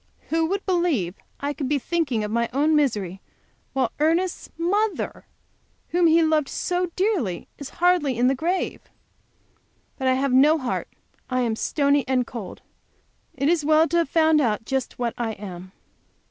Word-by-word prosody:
Who 325 Hz, 0 st, +1 dB
would 395 Hz, +3 st, -2 dB
believe 340 Hz, -, +1 dB, 0.3 s
I 285 Hz, +1 st, -2 dB
could 275 Hz, -2 st, -4 dB
be 295 Hz, -, +2 dB
thinking 280 Hz, -6 st, -1 dB
of 210 Hz, -, -4 dB
my 235 Hz, +1 st, 0 dB
own 300 Hz, +3 st, +3 dB
misery 205 Hz, -10 st, 0 dB, 0.5 s
while 260 Hz, -4 st, 0 dB
Ernest's 335 Hz, +4 st, 0 dB
mother, 405 Hz, +5 st, -1 dB, 0.6 s
whom 345 Hz, 0 st, +3 dB
he 330 Hz, +1 st, +5 dB
loved 310 Hz, -3 st, +2 dB
so 360 Hz, 0 st, -1 dB
dearly, 360 Hz, -, -1 dB
is 285 Hz, -, -7 dB
hardly 345 Hz, -8 st, +2 dB
in 245 Hz, +1 st, +3 dB
her 265 Hz, -, +3 dB
grave! 340 Hz, +7 st, -2 dB, 1.2 s
But 265 Hz, -, 0 dB
I 260 Hz, -, +4 dB
have 265 Hz, 0 st, 0 dB
no 295 Hz, +5 st, +6 dB
heart, 255 Hz, -4 st, -3 dB, 0.4 s
I 255 Hz, -1 st, 0 dB
am 230 Hz, -2 st, 0 dB
stony 280 Hz, +3 st, +1 dB
and 255 Hz, -1 st, +1 dB
cold. 220 Hz, -7 st, -8 dB, 0.7 s
It 275 Hz, 0 st, 0 dB
is 330 Hz, -1 st, +2 dB
well 310 Hz, +2 st, +4 dB
to 340 Hz, -, +1 dB
have 335 Hz, -5 st, +1 dB
found 315 Hz, -1 st, +4 dB
out 225 Hz, -3 st, 0 dB
just 265 Hz, 0 st, -2 dB
what 240 Hz, -2 st, -1 dB
I 225 Hz, -2 st, -1 dB
am! 185 Hz, -3 st, -9 dB
285 Hz, 165 wpm, -24 LUFS, 245-330 Hz, 1.2 s, no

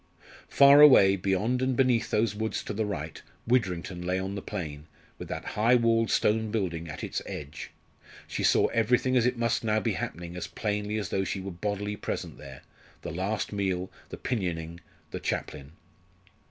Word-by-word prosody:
Far 140 Hz, +1 st, +7 dB
away, 100 Hz, -10 st, +8 dB
beyond 100 Hz, +7 st, 0 dB
and 130 Hz, 0 st, +1 dB
beneath 125 Hz, -3 st, +2 dB
those 110 Hz, -1 st, +1 dB
woods 110 Hz, +1 st, -3 dB
to -, -, -5 dB
the 105 Hz, 0 st, -1 dB
right, 80 Hz, -6 st, -5 dB, 0.2 s
Widrington 95 Hz, -7 st, 0 dB
lay 90 Hz, +1 st, -1 dB
on 95 Hz, +1 st, -3 dB
the 100 Hz, -, -4 dB
plain, 80 Hz, -7 st, -6 dB, 0.3 s
with -, -, -7 dB
that -, -, -5 dB
high 115 Hz, +4 st, +4 dB
walled 115 Hz, -1 st, +2 dB
stone 110 Hz, +1 st, +2 dB
building 85 Hz, -7 st, -2 dB
at 75 Hz, -, -7 dB
its -, -, -3 dB
edge. 75 Hz, +2 st, -7 dB, 0.6 s
She -, -, -4 dB
saw -, -, +4 dB
everything 125 Hz, +3 st, +2 dB
as 125 Hz, -1 st, +4 dB
it 125 Hz, -1 st, -1 dB
must 115 Hz, 0 st, 0 dB
now 110 Hz, -1 st, +2 dB
be 105 Hz, -, -1 dB
happening 85 Hz, +2 st, -5 dB
as 90 Hz, -, -5 dB
plainly 105 Hz, 0 st, -2 dB
as 105 Hz, -, -3 dB
though 95 Hz, -, 0 dB
she 95 Hz, -, -3 dB
were 95 Hz, +1 st, -6 dB
bodily 105 Hz, +3 st, -3 dB
present -, -, -5 dB
there 65 Hz, 0 st, -11 dB, 0.4 s
the -, -, -5 dB
last 100 Hz, +6 st, -2 dB
meal 95 Hz, -2 st, -2 dB, 0.2 s
the -, -, -7 dB
pinioning 85 Hz, -7 st, -3 dB, 0.3 s
the -, -, -4 dB
chaplain. 70 Hz, 0 st, -4 dB
105 Hz, 180 wpm, -28 LUFS, 90-115 Hz, 0.6 s, away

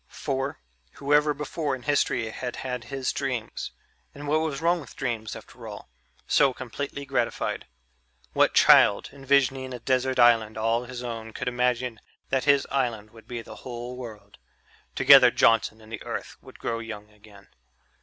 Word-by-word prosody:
For, 135 Hz, 0 st, -3 dB, 0.3 s
whoever 150 Hz, +1 st, +2 dB
before 150 Hz, 0 st, -2 dB
in 125 Hz, -, -12 dB
history 130 Hz, -4 st, +1 dB
had 125 Hz, +2 st, -5 dB
had 125 Hz, -2 st, -5 dB
his 135 Hz, -2 st, -2 dB
dreams 130 Hz, -5 st, -3 dB, 0.4 s
and 145 Hz, +1 st, -8 dB
what 155 Hz, +2 st, +2 dB
was 155 Hz, -4 st, -2 dB
wrong 170 Hz, +1 st, +2 dB
with 140 Hz, -, -13 dB
dreams, 115 Hz, -5 st, -3 dB
after -, -, -11 dB
all? -, -, -9 dB, 0.4 s
so 135 Hz, -2 st, +3 dB
completely 140 Hz, +3 st, -6 dB
gratified? -, -, -2 dB, 0.7 s
What -, -, +3 dB
child, 100 Hz, -, +6 dB
envisioning 135 Hz, -2 st, +1 dB
a -, -, -8 dB
desert 130 Hz, +1 st, 0 dB
island 115 Hz, -3 st, +4 dB
all 115 Hz, +2 st, 0 dB
his 125 Hz, 0 st, -7 dB
own 115 Hz, -2 st, -6 dB
could -, -, -5 dB
imagine 125 Hz, -1 st, 0 dB, 0.3 s
that 130 Hz, -1 st, 0 dB
his 140 Hz, -1 st, +4 dB
island 115 Hz, -6 st, -1 dB
would 115 Hz, -1 st, -16 dB
be 120 Hz, -2 st, -5 dB
the -, -, -11 dB
whole 120 Hz, 0 st, -7 dB
world? 110 Hz, -5 st, -10 dB, 0.6 s
Together 135 Hz, -2 st, +8 dB
Johnson 110 Hz, -1 st, +2 dB
and 110 Hz, 0 st, -15 dB
the -, -, -6 dB
Earth -, -, -6 dB
would -, -, -14 dB
grow 115 Hz, 0 st, -3 dB
young 105 Hz, -2 st, -8 dB
again. 105 Hz, -2 st, -18 dB
125 Hz, 160 wpm, -26 LUFS, 115-135 Hz, 0.7 s, Together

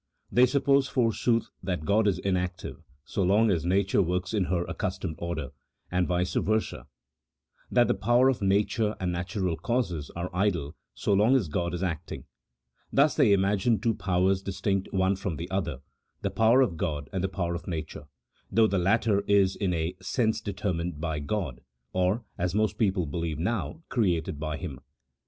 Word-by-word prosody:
They 125 Hz, +1 st, +5 dB
suppose, 140 Hz, +1 st, +3 dB
forsooth, 115 Hz, -2 st, +1 dB
that 90 Hz, -5 st, -3 dB
God 105 Hz, +4 st, +3 dB
is 95 Hz, -4 st, +2 dB
inactive 90 Hz, -1 st, -3 dB, 0.2 s
so -, -, -2 dB
long 105 Hz, +4 st, +4 dB
as 85 Hz, -2 st, 0 dB
nature 95 Hz, +2 st, +2 dB
works 90 Hz, +2 st, -1 dB
in 100 Hz, -4 st, +1 dB
her 85 Hz, -1 st, 0 dB
accustomed 80 Hz, -, -3 dB
order, 85 Hz, -5 st, -3 dB, 0.4 s
and 90 Hz, 0 st, +1 dB
vice 90 Hz, 0 st, 0 dB
versa, 110 Hz, 0 st, -1 dB, 0.8 s
that -, -, +4 dB
the -, -, +3 dB
power 120 Hz, +4 st, +3 dB
of 135 Hz, -5 st, +1 dB
nature 105 Hz, +2 st, +1 dB
and 90 Hz, -1 st, -1 dB
natural 90 Hz, 0 st, -2 dB
causes 90 Hz, -, -2 dB
are 85 Hz, +2 st, -4 dB
idle 90 Hz, -6 st, 0 dB, 0.2 s
so 100 Hz, -, 0 dB
long 105 Hz, +7 st, +4 dB
as 115 Hz, -10 st, +2 dB
God 85 Hz, +3 st, -1 dB
is 90 Hz, -, -3 dB
acting: 85 Hz, -3 st, -4 dB, 0.7 s
thus 145 Hz, +2 st, +4 dB
they 110 Hz, -, +4 dB
imagine 100 Hz, +3 st, +2 dB
two 115 Hz, -2 st, +1 dB
powers 95 Hz, -1 st, +1 dB
distinct 95 Hz, 0 st, -2 dB
one 95 Hz, 0 st, +2 dB
from 95 Hz, -3 st, -3 dB
the 85 Hz, +4 st, -5 dB
other, 85 Hz, -9 st, -2 dB, 0.4 s
the -, -, 0 dB
power 115 Hz, +4 st, +4 dB
of 95 Hz, -11 st, +1 dB
God 75 Hz, -4 st, -2 dB
and 95 Hz, -1 st, -1 dB
the 95 Hz, -, 0 dB
power 90 Hz, -2 st, -2 dB
of 85 Hz, -, -6 dB
nature, 80 Hz, -3 st, -5 dB, 0.4 s
though 115 Hz, 0 st, +5 dB
the 100 Hz, -3 st, +1 dB
latter 100 Hz, +2 st, +2 dB
is 100 Hz, -2 st, +4 dB
in 95 Hz, -3 st, -1 dB
a 85 Hz, +1 st, -1 dB
sense 110 Hz, -3 st, 0 dB
determined 90 Hz, -5 st, -3 dB
by 80 Hz, -2 st, -2 dB
God, 75 Hz, -, -3 dB, 0.3 s
or 95 Hz, +5 st, +1 dB
(as 90 Hz, +2 st, -1 dB
most 110 Hz, 0 st, +1 dB
people 95 Hz, -5 st, +2 dB
believe 80 Hz, +1 st, -3 dB
now) 115 Hz, -, -2 dB
created 85 Hz, -, 0 dB
by 75 Hz, 0 st, -3 dB
Him. 65 Hz, -5 st, -6 dB
95 Hz, 175 wpm, -27 LUFS, 85-105 Hz, 0.8 s, They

